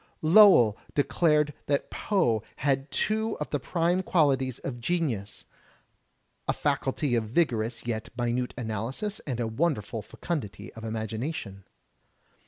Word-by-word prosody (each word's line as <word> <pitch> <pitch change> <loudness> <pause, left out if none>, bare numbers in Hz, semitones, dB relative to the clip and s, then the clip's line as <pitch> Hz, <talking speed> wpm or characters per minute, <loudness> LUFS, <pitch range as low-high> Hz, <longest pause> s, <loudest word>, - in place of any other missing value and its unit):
Lowell 160 - +7 0.2
declared 150 0 +2
that 140 -1 0
Poe 120 - +1
had 135 0 0
two 220 +1 0
of 150 - -5
the 145 - 0
prime 170 +6 +1
qualities 135 -8 +2
of 120 -3 -6
genius, 120 - -2 0.5
— - - -45
"a - - +2
faculty 140 -1 0
of 115 -2 +1
vigorous 115 -3 0
yet 115 -2 -3
minute 120 +1 -1
analysis 120 - -3
and 125 -4 -2
a 120 - 0
wonderful 115 - -1
feomdity 105 - -5
of 115 - -11
imagination." 110 - -4
130 Hz, 125 wpm, -28 LUFS, 115-160 Hz, 0.5 s, Lowell